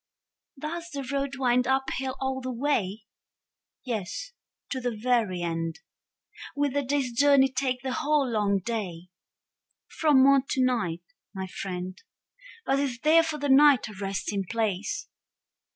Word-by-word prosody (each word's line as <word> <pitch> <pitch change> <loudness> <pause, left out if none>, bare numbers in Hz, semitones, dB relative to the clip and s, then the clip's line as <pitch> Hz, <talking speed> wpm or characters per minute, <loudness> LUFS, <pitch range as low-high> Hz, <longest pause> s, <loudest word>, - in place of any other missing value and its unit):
Does 335 +4 -5
the 280 -1 -4
road 275 0 -1
wind 250 -2 +2
up 265 0 +1
hill 265 0 -3
all 265 0 -2
the 255 0 -4
way? 230 -6 -1 0.8
Yes, 225 - -4 0.4
to 260 - -1
the 245 - 0
very 220 -6 +1
end. 165 -1 -3 0.7
Will 285 -1 +1
the 285 +2 0
day's 275 -2 -1
journey 270 +2 +5
take 255 -2 -1
the 260 -1 -2
whole 300 -1 +1
long 210 -4 +1
day? 185 -7 -4 0.9
From 295 -5 +5
morn 275 0 +6
to 260 -1 +2
night, 185 -10 -1 0.3
my 190 0 -3
friend. 185 0 -6 0.6
But 270 +1 +2
is 270 -4 -1
there 320 +2 +6
for 320 -2 -3
the 290 0 -2
night 275 -1 +6
a - - -9
resting 195 0 -3
place? 220 - -2
255 Hz, 145 wpm, -27 LUFS, 205-280 Hz, 0.9 s, morn